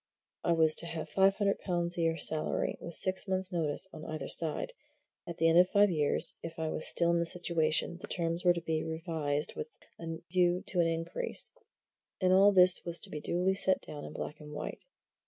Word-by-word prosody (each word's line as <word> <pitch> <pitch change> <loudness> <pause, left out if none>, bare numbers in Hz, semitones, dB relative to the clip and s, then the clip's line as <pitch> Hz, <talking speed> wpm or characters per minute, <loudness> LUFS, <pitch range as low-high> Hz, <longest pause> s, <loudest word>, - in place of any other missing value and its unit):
I 170 - +2
was 160 -1 +4
to 170 - +4
have 165 -1 -6
five 195 0 +3
hundred 200 -1 0
pounds 175 -2 -2
a 170 - -2
year 165 0 +1
salary, 155 -2 +1
with 170 - -5
six 190 +2 -2
months' 190 0 -1
notice 160 -3 -1
on 155 - -9
either 155 -2 -5
side; 165 - 0 0.5
at 170 - -7
the 165 - +2
end 165 +1 +5
of 180 +1 +4
five 205 -1 +4
years, 150 -3 +1
if 165 0 -8
I 160 -1 -2
was 155 - +1
still 170 0 +2
in 170 - +1
the 170 - 0
situation, 165 -2 0
the - - -8
terms 170 0 -3
were 175 -1 +5
to 170 - -5
be 160 -1 -2
revised 160 -3 -3
with 460 - -5 0.3
a 165 -1 -5
view 180 0 +2
to 180 - -2
an 170 - +3
increase 165 - -2 0.7
and 185 -1 +2
all 195 +2 +6
this 185 -1 +6
was 170 -1 +1
to - - -1
be 150 - -5
duly 180 +4 0
set 190 -1 +2
down 145 -1 -9
in - - -9
black 150 - -6
and 150 -1 -11
white. - - -6
170 Hz, 215 wpm, -31 LUFS, 160-185 Hz, 0.7 s, all